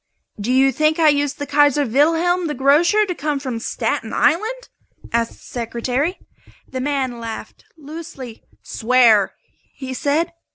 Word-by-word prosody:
"Do 210 Hz, +5 st, -2 dB
you 265 Hz, +1 st, +4 dB
think 310 Hz, +4 st, +1 dB
I 320 Hz, -2 st, +5 dB
used 290 Hz, 0 st, 0 dB
the 285 Hz, -, -4 dB
'Kaiser 290 Hz, 0 st, +3 dB
Wilhelm 330 Hz, +8 st, +2 dB
the 295 Hz, -, -3 dB
Grocer' 310 Hz, +11 st, +3 dB
to 370 Hz, -, -3 dB
come 300 Hz, -3 st, -2 dB
from 255 Hz, -4 st, -4 dB
Staten 225 Hz, -1 st, -3 dB
Island?" 435 Hz, +12 st, 0 dB, 0.5 s
asked 230 Hz, 0 st, 0 dB
the -, -, -20 dB
Secretary. 250 Hz, -, -3 dB, 0.5 s
The 260 Hz, -, -5 dB
man 265 Hz, -3 st, -2 dB
laughed, 225 Hz, -1 st, -8 dB
loosely. 295 Hz, -6 st, -9 dB, 0.2 s
"Swear!" 230 Hz, -4 st, +3 dB, 0.4 s
he 260 Hz, -2 st, -6 dB
said. 295 Hz, +6 st, 0 dB
285 Hz, 140 wpm, -20 LUFS, 250-315 Hz, 0.5 s, I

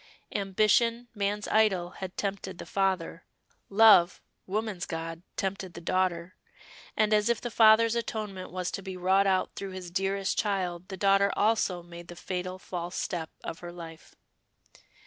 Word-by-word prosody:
Ambition, 220 Hz, +4 st, +2 dB
man's 205 Hz, 0 st, -2 dB
idol, 195 Hz, -5 st, +2 dB
had 185 Hz, 0 st, -8 dB
tempted 195 Hz, -2 st, -3 dB
the -, -, -8 dB
father; 190 Hz, -3 st, -1 dB, 0.5 s
love, 200 Hz, -4 st, +6 dB, 0.3 s
woman's 205 Hz, -2 st, -2 dB
god, 165 Hz, 0 st, -5 dB, 0.2 s
tempted 190 Hz, -2 st, -3 dB
the -, -, -6 dB
daughter; 175 Hz, 0 st, -1 dB, 0.6 s
and, 215 Hz, 0 st, +3 dB
as 210 Hz, +1 st, +3 dB
if 235 Hz, -, +2 dB
the 240 Hz, -, -5 dB
father's 225 Hz, 0 st, +6 dB
atonement 215 Hz, -5 st, -4 dB
was 185 Hz, 0 st, -3 dB
to -, -, -4 dB
be 190 Hz, -1 st, -7 dB
wrought 190 Hz, +2 st, +3 dB
out 190 Hz, -1 st, +1 dB
through 195 Hz, -, -5 dB
his 185 Hz, -2 st, -8 dB
dearest 195 Hz, +1 st, -1 dB
child 185 Hz, -4 st, -1 dB
the 190 Hz, -, -6 dB
daughter 195 Hz, +1 st, +3 dB
also 205 Hz, -5 st, +1 dB
made 170 Hz, 0 st, -11 dB
the 175 Hz, -, -9 dB
fatal 185 Hz, +1 st, -4 dB
false 180 Hz, -1 st, -6 dB
step 165 Hz, -3 st, -3 dB
of 165 Hz, -, -6 dB
her 175 Hz, 0 st, -8 dB
life. 165 Hz, -2 st, -11 dB
190 Hz, 155 wpm, -28 LUFS, 180-210 Hz, 0.6 s, love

